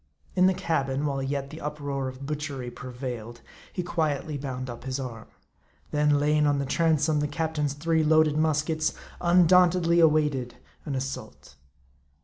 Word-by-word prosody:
In 185 0 +5
the 190 - +2
cabin, 140 -4 -1
while 140 -2 -1
yet 140 +1 -3
the 160 - -9
uproar 145 -2 -3
of 130 +1 -7
butchery 140 -4 -4
prevailed, 120 -2 -7 0.3
he 180 - -3
quietly 155 -3 -1
bound 130 -2 -4
up 120 -1 -8
his 130 0 -3
arm; 120 -4 -6 0.6
then 150 -1 +3
laying 150 +1 +3
on 145 -1 +2
the 140 - -1
transom 155 0 +2
the 150 - 0
captain's 155 -2 -1
three 160 +2 +1
loaded 155 -1 +4
muskets, 155 0 +1 0.3
undauntedly 175 0 +5
awaited 150 -6 +2 0.3
an 140 - -2
assault. 130 - -6
150 Hz, 145 wpm, -27 LUFS, 135-160 Hz, 0.6 s, In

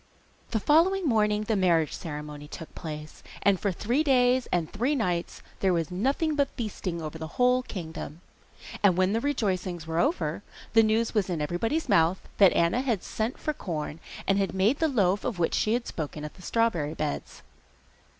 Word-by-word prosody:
The 220 - 0
following 345 - +3
morning 210 -5 +2
the 220 +1 0
marriage 170 -5 +2
ceremony 150 -2 -7
took 160 +2 -9
place, 155 -2 -7 0.2
and 200 -2 +4
for 200 - 0
three 235 - 0
days 255 -3 +3
and 170 -3 +1
three 250 +8 +1
nights 180 -9 -2 0.2
there 190 -2 +2
was 165 -2 -1
nothing 275 - 0
but 280 -2 +1
feasting 185 -7 -4
over 155 +1 -6
the 160 - -5
whole 250 0 +4
kingdom. 165 - -7 0.6
And 190 -4 +4
when 185 +2 +3
the 225 - +1
rejoicings 185 - -1
were 165 +1 -1
over 295 - 0 0.3
the 225 - +7
news 220 +1 +1
was 210 -4 +1
in 170 -3 -1
everybody's 200 - -1
mouth 175 -4 +2
that 195 -3 +8
Anna 170 +9 +2
had 235 -8 -1
sent 225 +3 -3
for 305 - -2
corn, 155 - -5 0.3
and 195 0 +2
had 195 -1 -1
made 210 +9 +2
the 320 - +3
loaf 200 -8 +2
of 240 -7 -2
which 170 -1 +1
she 215 - +2
had 240 0 0
spoken 150 -1 -5
at 150 - -7
the 185 - -16
strawberry 175 -9 0
beds. 70 0 -4
195 Hz, 185 wpm, -27 LUFS, 170-240 Hz, 0.6 s, that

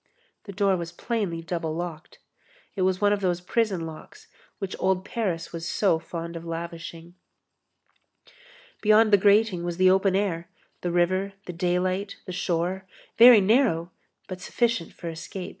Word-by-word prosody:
The 200 - -7
door 195 -1 +1
was 170 -1 -5
plainly 185 -4 -3
double 165 -2 -3
locked. 170 -1 -6 0.6
It 195 - -2
was 185 0 +1
one 205 0 +3
of 205 - -2
those 180 -2 0
prison 190 -2 -1
locks 420 - -11 0.3
which 195 -1 -5
old 190 0 +1
Paris 185 -9 -3
was 165 +1 -5
so 190 -6 +2
fond 170 0 -7
of 165 - -6
lavishing. 170 0 -7 1.7
Beyond 215 0 +5
the - - +9
grating 205 -2 +3
was 175 -1 -3
the 185 0 +5
open 190 0 +3
air, 180 -4 -1 0.3
the 175 - -2
river, 185 +3 +1
the 180 - -6
daylight, 185 +3 -1
the 185 - -6
shore, 180 +1 -2 0.3
very 235 -2 +10
narrow 190 -6 +2 0.4
but 185 -1 -7
sufficient 230 -3 -1
for 170 - -9
escape. 170 +3 -6
185 Hz, 155 wpm, -26 LUFS, 170-200 Hz, 1.7 s, very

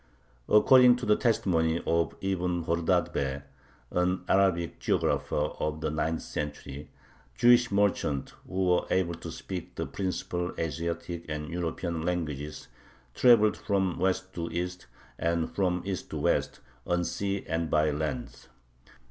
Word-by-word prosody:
According 125 +3 +7
to 125 - -5
the 105 - +4
testimony 85 -9 +1
of 85 0 +1
Ibn 90 -3 -1
Khordadbeh, 70 -5 0 0.5
an 90 +1 0
Arabic 95 -4 +2
geographer - - 0 0.2
of 75 0 -2
the 80 - -1
ninth 80 +1 -1
century, 75 0 -6 0.5
Jewish 120 - +5
merchants, 100 -9 0
who 95 0 -1
were 90 -1 +2
able 90 -2 +1
to 85 - -7
speak 90 -3 -7
the - - -2
principal 90 -2 -3
Asiatic 85 +2 -3
and 75 0 -4
European 85 -1 -3
languages, 75 -4 -3 0.5
"traveled 115 - +5
from 95 -5 -1
West 95 +1 0
to 85 -1 -4
East 90 +1 -4 0.3
and 85 -1 0
from 90 -3 0
East 95 -2 -4
to - - -4
West, - - 0 0.3
on 90 0 +1
sea 100 +2 -2
and 80 0 -2
by 75 +1 +3
land." 75 -4 -4
85 Hz, 130 wpm, -28 LUFS, 80-95 Hz, 0.5 s, According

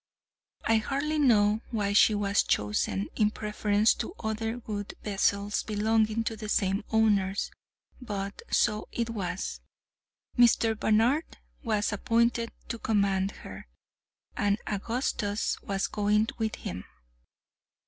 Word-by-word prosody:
I 225 - +3
hardly 285 +7 -1
know 215 -5 +4
why 205 -3 -1
she 210 +1 +6
was 205 0 +2
chosen 105 -1 0
in 210 -1 +3
preference 210 0 +1
to 360 - -5
other 225 +1 -2
good 205 -4 -6
vessels 200 0 0
belonging 220 +1 +1
to 225 - -3
the 215 0 -7
same 195 -1 +1
owners—but 205 0 -2
so 215 -1 +1
it 235 -1 -2
was. 195 -4 -4 0.7
Mr. 235 -2 +4
Barnard 230 - +1 0.2
was 215 -4 0
appointed 230 +2 +1 0.2
to 230 - -4
command 200 -3 +1 0.2
her, - - -9 0.7
and 205 -3 +1
Augustus 210 -1 -2
was 195 -1 -1
going 210 +1 +1
with 220 -1 -1
him. 90 +1 -6
215 Hz, 115 wpm, -28 LUFS, 205-225 Hz, 0.7 s, she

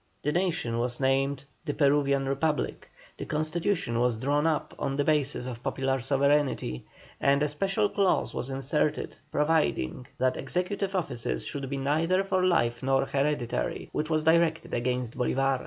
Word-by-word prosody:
The 150 - +1
nation 165 -10 0
was 120 0 -2
named 135 +1 +1 0.2
"The 145 -3 -3
Peruvian 140 -2 +3
Republic;" 150 +3 -1 0.3
the - - -4
constitution 155 - -1
was 120 -1 +2
drawn 145 +6 +1
up 160 -2 -1
on 135 - -1
the 145 - +1
basis 145 -4 +1
of 120 -2 -6
popular 135 +1 -1
sovereignty, 140 - +1 0.3
and 140 +1 +3
a - - +2
special 195 +7 0
clause 200 -2 +1
was 130 - -3
inserted 135 +3 -1
providing 150 - +1
that 130 0 +1
executive 190 +6 -2
offices 115 - -2
should 140 -2 -4
be 140 - -2
neither 160 +7 +1
for 185 -1 0
life 120 -10 +2
nor 135 0 +2
hereditary, 140 -3 -1
which 155 +1 -2
was 155 -1 +1
directed 165 0 +2
against 125 -1 -1
Bolívar. 135 +1 +1
140 Hz, 155 wpm, -28 LUFS, 130-160 Hz, 0.3 s, Peruvian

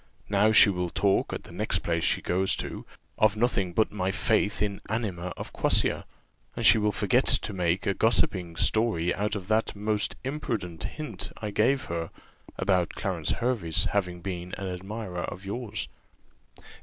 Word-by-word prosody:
"Now 105 +2 +4
she 105 -1 +7
will 90 -2 -2
talk, 100 +2 +1
at - - -4
the - - -13
next - - -1
place - - 0
she - - +1
goes 95 +2 +1
to, - - -6 0.3
of 110 -1 +4
nothing 105 -6 +1
but 110 +5 +2
of - - -19
my 95 -2 -1
faith 105 +2 +1
in 100 -1 -1
anima 95 -6 -2
of - - -7
quassia; - - +2 0.5
and - - -2
she 110 - +8
will 105 0 +2
forget 115 +6 +2
to 105 - +2
make 90 0 0
a 100 - +2
gossiping 95 -6 +1
story 100 -3 +1
out 105 +1 -1
of 95 -3 -5
that 110 0 +1
most 105 0 -1
imprudent 105 - -3
hint 150 +8 -5
I 105 -2 -4
gave 130 +6 +2
her, 85 -1 -3 0.5
about 90 -3 +1
Clarence 90 -5 -2
Hervey's 115 -10 0
having 90 -4 -1
been 90 -1 -5
an 100 - -5
admirer 95 -1 -5
of 95 +2 -8
yours." 110 +1 -4
100 Hz, 170 wpm, -27 LUFS, 90-110 Hz, 0.5 s, she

